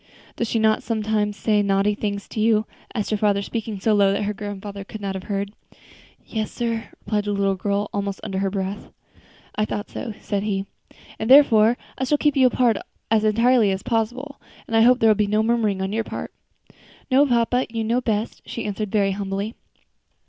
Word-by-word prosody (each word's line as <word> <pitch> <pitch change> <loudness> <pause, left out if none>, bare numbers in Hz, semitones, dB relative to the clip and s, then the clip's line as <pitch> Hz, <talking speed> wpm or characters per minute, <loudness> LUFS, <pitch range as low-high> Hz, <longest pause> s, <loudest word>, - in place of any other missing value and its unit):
"Does 235 - -2
she - - 0
not 220 -1 +3
sometimes 215 -2 -1
say 210 -2 +2
naughty 200 +1 +2
things 205 -1 -3
to - - -5
you?" 215 0 +3 0.3
asked 210 -2 -2
her 215 - +2
father, 200 -1 +2
speaking 220 -2 -4
so 215 +3 +2
low 200 -1 +4
that 200 - -1
her 210 +1 -1
grandfather 205 -1 -6
could 215 +2 -9
not 200 -1 -3
have 190 -1 -6
heard. 200 0 -3 0.7
"Yes, 215 -2 -3
sir," 230 -2 -2 0.2
replied 210 -1 0
the 205 - -1
little 200 -1 +1
girl, 200 +2 -1
almost 200 -1 -2
under 195 -3 -3
her 195 0 0
breath. 195 +1 -4 0.6
"I 210 - 0
thought 205 0 -5
so," 240 - -5
said 200 -2 -2
he, 195 -2 -2 0.5
"and 220 - -2
therefore 240 -4 +7 0.2
I 260 - 0
shall 295 +3 +2
keep 295 -1 +2
you 260 -2 +6
apart 245 -4 +2 0.3
as 220 -1 +3
entirely 230 +1 +4
as 190 0 -2
possible; 245 +5 -2 0.2
and 225 - -3
I 225 - +6
hope 245 +2 +6
there 225 - +5
will - - +6
be 210 0 +1
no 215 +1 +2
murmuring 220 -4 +1
on 190 +2 -3
your 225 +1 0
part." - - -6 0.8
"No, 280 +3 +5
papa, 245 0 +2
you 225 0 -3
know 235 +3 +1
best," 220 -2 -2
she 230 - -6
answered, 210 0 -3
very 200 -2 +2
humbly. 200 +2 -3
215 Hz, 200 wpm, -23 LUFS, 200-230 Hz, 0.8 s, therefore